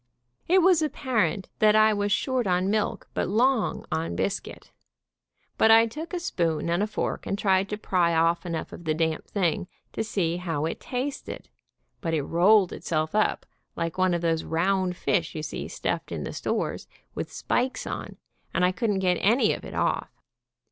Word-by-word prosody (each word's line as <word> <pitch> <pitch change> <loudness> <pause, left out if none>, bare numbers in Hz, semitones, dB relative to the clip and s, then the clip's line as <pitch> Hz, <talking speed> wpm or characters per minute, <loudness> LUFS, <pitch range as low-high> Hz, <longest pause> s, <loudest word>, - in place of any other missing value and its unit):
It 365 +1 +5
was 360 -3 +5
ap 305 - -1
parent 210 - 0
that 215 0 +5
I 215 0 +6
was 205 0 -1
short 255 +2 +1
on 185 +1 +1
milk 215 -1 -1
but - - -1
long 240 +3 +1
on 160 - -2
biscuit, - - -4 0.9
but 220 - +5
I 225 +1 +8
took 305 +9 -7
a 360 - -2
spoon 170 - -1
and 175 +3 +1
a 210 - +1
fork 215 - -3
and 200 - -1
tried 195 -1 +2
to 210 - -3
pry 175 -5 +1
off 165 +1 +2
enough 165 -3 -4
of 170 - -10
the 155 -1 +1
damp 160 -1 -1
thing 185 -1 0 0.3
to - - -1
see 175 -6 -1
how 165 -4 -2
it 165 - -3
tasted, 265 +3 -5 0.5
but 165 -4 -1
it 150 - 0
rolled 185 +5 +4
itself 155 -1 -2
up 215 0 +1 0.3
like 165 +2 -3
one 185 -1 +3
of 170 - -2
those 165 -1 0
round 180 +2 0
fish 170 -6 0
you 155 - -4
see 145 - -5
stuffed - - -3
in - - -3
the - - -5
stores, - - -2 0.3
with - - -5
spikes 255 +2 -1
on, - - -6 0.4
and 180 - +3
I 180 - +3
couldn't 205 -1 -1
get 180 -1 +3
any 230 +7 +3
of - - -7
it - - -8
off. - - 0
190 Hz, 190 wpm, -26 LUFS, 170-220 Hz, 0.9 s, I